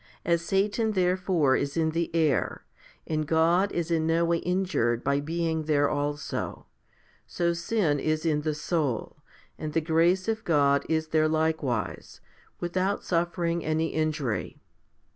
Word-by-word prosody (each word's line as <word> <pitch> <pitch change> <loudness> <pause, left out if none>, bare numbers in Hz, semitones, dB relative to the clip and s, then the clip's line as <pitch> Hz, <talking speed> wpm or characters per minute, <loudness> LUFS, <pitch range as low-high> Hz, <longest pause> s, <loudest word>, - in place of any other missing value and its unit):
As 170 0 +2
Satan 205 +5 0
therefore 180 -6 +2
is 140 +2 -2
in 160 -1 +2
the 165 +1 -1
air, 155 -6 +1 0.4
and 155 -1 -2
God 170 +5 +3
is 170 -1 -2
in 160 -1 +1
no 165 +1 +2
way 170 0 +2
injured 175 -11 0
by 140 0 +1
being 160 +1 -2
there 145 -2 +3
also, 145 0 -3 0.6
so 170 -1 0
sin 170 -3 0
is 155 +2 -1
in 150 -2 +1
the 155 0 -1
soul, 150 -6 -2 0.4
and 155 -1 -4
the 165 - +3
grace 170 +4 +2
of 225 0 -1
God 140 -5 +2
is 160 -1 0
there 155 0 +3
likewise, 155 - -1 0.4
without 185 +3 -1
suffering 170 -1 -1
any 160 +1 0
injury. 150 - -2
160 Hz, 145 wpm, -27 LUFS, 150-170 Hz, 0.6 s, God